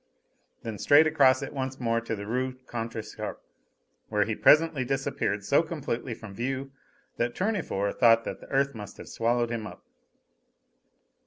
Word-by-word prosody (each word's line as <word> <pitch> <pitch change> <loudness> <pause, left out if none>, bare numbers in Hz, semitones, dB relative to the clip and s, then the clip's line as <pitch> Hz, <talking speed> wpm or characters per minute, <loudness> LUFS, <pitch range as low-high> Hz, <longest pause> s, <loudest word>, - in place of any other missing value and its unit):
Then 110 -3 -5
straight 145 +2 +6
across 140 -4 +4
it - - -6
once 130 -1 -4
more 115 -1 0
to 115 -1 -3
the 100 -1 -7
Rue 130 +4 -1
Contrescarpe, 115 -2 -5 0.7
where 105 -2 +2
he 110 - -2
presently 155 +3 +4
disappeared 125 -6 -2
so 140 - +4
completely 140 -7 -4
from 110 -3 -10
view 135 +5 -3 0.5
that 120 0 -1
Tournefort 180 - -1
thought 115 -2 +6
that - - -5
the - - -13
earth 140 +1 +1
must 105 -3 -9
have - - -10
swallowed 120 +1 0
him 110 -2 -3
up. - - -12
120 Hz, 155 wpm, -28 LUFS, 115-135 Hz, 0.7 s, straight